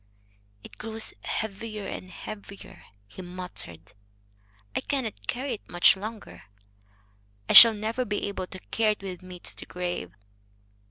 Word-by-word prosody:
"It - - -13
grows 220 0 -3
heavier 215 0 -4
and 185 - -6
heavier," 200 +2 -10 0.2
he 100 - -10
muttered. 110 - -8 0.8
"I - - +1
cannot 260 -7 -3
carry 255 +1 -2
it 215 - -9
much 175 +2 +6
longer. 195 - -8 1.0
I - - +1
shall 230 -1 +12
never 220 +4 -2
be 205 -4 -2
able 195 -2 -4
to 185 - -9
carry 220 -1 +3
it 205 - -16
with 185 -2 -6
me 185 -1 -10
to - - -8
the - - -9
grave." 175 - -4
200 Hz, 145 wpm, -27 LUFS, 180-220 Hz, 1.0 s, shall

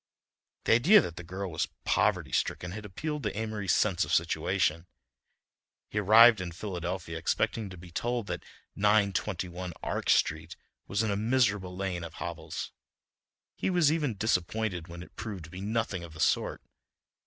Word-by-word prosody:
The - - +1
idea 170 - +7
that 85 - -3
the 90 - -6
girl 95 +2 -5
was 80 - -1 0.2
poverty - - +2
stricken 90 - -1
had 105 +2 -7
appealed 150 - -4
to 105 - -3
Amory's 110 -4 -1
sense 95 -5 +2
of - - -5
situation. 80 +3 +1 1.0
He 105 - 0
arrived 110 +1 +7
in 90 -2 -5
Philadelphia 85 -3 -4
expecting 100 +5 0
to 90 - -10
be 85 0 -12
told 120 +5 -1
that - - -4 0.3
921 100 -3 0
Ark - - -2
Street - - +2 0.3
was 100 +2 0
in 110 - 0
a - - 0
miserable 105 -4 +1
lane 95 -3 -2
of 85 -1 -8
hovels. - - -5 0.8
He - - -2
was 175 -5 +4
even 145 -9 0
disappointed 95 -3 -1
when 85 0 -8
it - - -17
proved 105 -6 -6
to 80 - -12
be 90 +1 -7
nothing 105 -3 -1
of 85 -2 -10
the 80 - -12
sort. - - +1
100 Hz, 165 wpm, -29 LUFS, 90-110 Hz, 1.0 s, idea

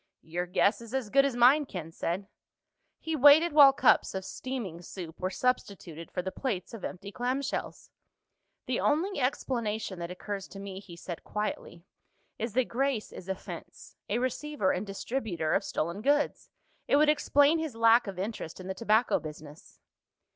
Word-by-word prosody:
"Your 175 +2 -3
guess 200 +4 +2
is 230 +2 -7
as 245 -6 -2
good 275 0 +5
as 275 -3 -1
mine," 260 +5 +5
Ken 170 -7 -6
said. 175 +4 -3 0.7
He 320 0 -3
waited 295 +4 +7
while 285 -2 +9
cups 270 - +3
of 190 0 -4
steaming 225 -12 -5
soup 175 -2 -9
were 185 - -1
substituted 190 -7 -2
for 180 - -3
the 190 - -3
plates 215 -6 -3
of 225 - -8
empty 195 +2 -6
clamshells. 255 +4 -3 0.7
"The 255 - -1
only 335 +5 +1
explanation 225 -7 -2
that 170 0 -4
occurs 195 +2 -5
to 195 - -10
me," 195 -1 -7
he 190 -3 -12
said 170 0 -7
quietly, 200 -4 -4 0.5
"is 230 -1 -3
that 255 +1 +2
Grace 260 -2 -1
is 185 - -10
a 190 - 0
fence—a 190 - -7
receiver 255 -3 -1
and 190 +3 -3
distributor 195 -6 -2
of - - +2
stolen 170 +6 -3
goods. 290 +4 +1 0.4
It - - +3
would 300 +1 +5
explain 290 +1 +4
his 315 -7 -4
lack 230 +1 +5
of 195 -2 -6
interest 190 -4 -5
in 185 - -8
the 190 - -3
tobacco 220 +3 +2
business." 150 -1 -11
215 Hz, 170 wpm, -29 LUFS, 185-265 Hz, 0.7 s, while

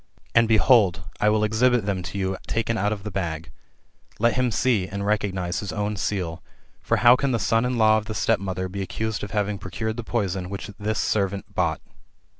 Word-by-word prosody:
And 115 -1 +5
behold, 110 -4 +4 0.2
I 105 - +3
will 105 0 +2
exhibit 115 +1 +2
them 100 -3 -1
to 90 - -6
you 95 -1 -1
taken 115 0 -1
out 105 -1 0
of 105 -2 -4
the 105 - -5
bag. 85 -4 -4 0.7
Let 115 +1 +3
him 125 +1 +1
see, 115 -5 +1
and 100 +1 -4
recognise 95 -4 -1
his 100 -3 -4
own 105 0 -2
seal. 90 -4 -2 0.4
For - - +1
how 120 +1 +9
can 135 0 0
the - - +2
son 115 +1 +1
in 125 0 -1
law 110 -1 +5
of 110 - -10
the 110 0 -5
stepmother 95 -2 0
be 100 +2 -5
accused 110 +2 -3
of 105 - -4
having 105 -1 -1
procured 110 +5 -4
the 120 - -4
poison 95 -6 -2
which 100 +2 -6
this 105 +1 -1
servant 100 -2 -1
bought - - 0
105 Hz, 205 wpm, -24 LUFS, 95-110 Hz, 0.7 s, how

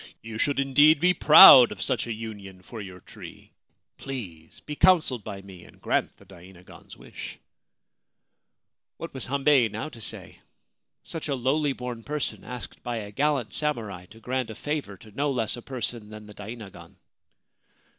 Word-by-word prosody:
You 110 -1 -8
should 140 +2 0
indeed 145 +3 +4
be 180 +3 +3
proud 140 -6 +9
of - - -8
such 125 -4 -1
a - - -4
union 105 -4 -8
for 110 +3 -9
your 90 -2 -10
tree! - - -13 0.5
Please 95 -13 -8
be 150 - -7
counselled 155 - +3
by 100 0 -8
me 95 -3 -13
and - - -18
grant - - -1
the - - -19
dainagon's 90 +1 -15
wish! - - -10 0.8
' - - -57
What 165 - -8
was 130 - -6
Hambei 135 -3 +3
now 110 +9 -6
to 115 - -14
say? - - -7 0.6
Such 165 -2 -6
a 140 - -1
lowly 135 +3 0
born 125 -2 -7
person, 150 +1 -4
asked 125 -2 -9
by 120 -1 -4
a 105 -2 -7
gallant 140 0 -1
samurai 110 - -3
to 110 +4 -16
grant 125 +1 -3
a 110 - -8
favour 145 -10 -5
to 110 +3 -16
no 145 +7 -1
less 120 -5 -1
a 120 - -10
person 120 -4 -4
than 105 0 -11
the 105 - -13
dainagon 105 0 -11
120 Hz, 170 wpm, -25 LUFS, 105-140 Hz, 0.8 s, proud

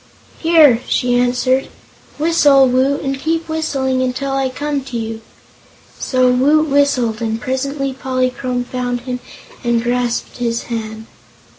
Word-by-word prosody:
"Here," 315 -8 +5
she 245 0 +1
answered. 250 +2 +1 0.5
"Whistle, 290 -4 +4
Woot, 260 +3 +1
and 270 -1 -2
keep 325 +3 -1
whistling 275 -5 -1
until 255 +2 -2
I 270 -1 0
come 285 +1 -3
to 250 -3 -5
you." 225 0 -5 0.8
So 255 -1 +2
Woot 295 +5 +3
whistled, 270 -6 +1
and 225 0 -2
presently 275 +2 -2
Polychrome 255 -1 -2
found 245 -1 -3
him 250 0 -4 0.4
and 235 -1 +1
grasped 240 0 -2
his 235 -1 -2
hand. 220 -1 -5
255 Hz, 130 wpm, -17 LUFS, 245-275 Hz, 0.8 s, Here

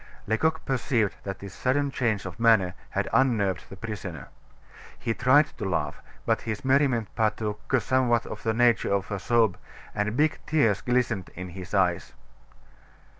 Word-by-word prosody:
Lecoq 160 +10 0
perceived 125 -5 0
that 100 -1 -4
this 100 0 -9
sudden 140 +2 0
change 110 -7 -1
of 90 +1 -7
manner 110 -6 +4 0.2
had - - -1
unnerved 105 -9 +2
the - - -9
prisoner. 95 - -6 0.7
He 115 - -2
tried 130 +5 +3
to 95 - -2
laugh, 90 - -2 0.2
but - - +1
his 110 +2 -5
merriment 130 -5 +2
partook 105 -1 -1
somewhat 120 -2 +1
of - - -7
the 110 -1 0
nature 120 -3 +3
of 100 +1 -1
a 100 - -2
sob, 115 -3 +2 0.4
and 105 +2 -1
big 155 +1 +2
tears 115 -11 +2
glistened 120 -6 0
in 90 +1 -6
his 90 +2 -7
eyes. 90 -3 +1
110 Hz, 155 wpm, -26 LUFS, 100-125 Hz, 0.7 s, manner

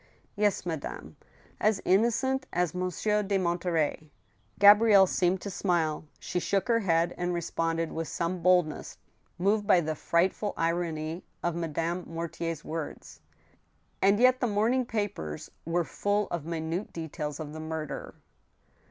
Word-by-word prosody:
" - - -33
Yes, 205 -2 +1
madame; 160 -4 -5 0.4
as 215 -2 +2
innocent 240 +7 +2
as 175 -3 0
Monsieur 185 +4 0
de 200 -1 0
Monterey! 170 -4 -1 0.3
" 105 0 -39
Gabrielle 205 -1 +8
seemed 180 0 +1
to 200 - -5
smile. 165 -5 0
She 180 - -3
shook 195 +2 0
her 230 -1 +4
head, 170 -4 +1
and 175 0 -1
responded 165 -1 -1
with 165 0 -3
some 170 +1 -2
boldness, 180 -3 +2 0.4
moved 205 +3 +1
by 180 - +6
the 160 -2 -1
frightful 185 +6 0
irony 165 0 -1 0.2
of 175 - 0
Madame 170 +2 -2
Mortier's 165 -1 -4
words: 160 -1 -6 0.4
" - - -41
And 200 +2 +4
yet 255 +1 +5
the 245 - +1
morning 235 +4 +1
papers 195 - -4
were 170 +2 +1
full 205 +5 -1
of 170 -4 -3
minute 165 +3 -3
details 155 -2 -5
of 150 -1 -6
the 155 - -7
murder." 155 -1 -5
175 Hz, 145 wpm, -29 LUFS, 165-200 Hz, 0.4 s, Gabrielle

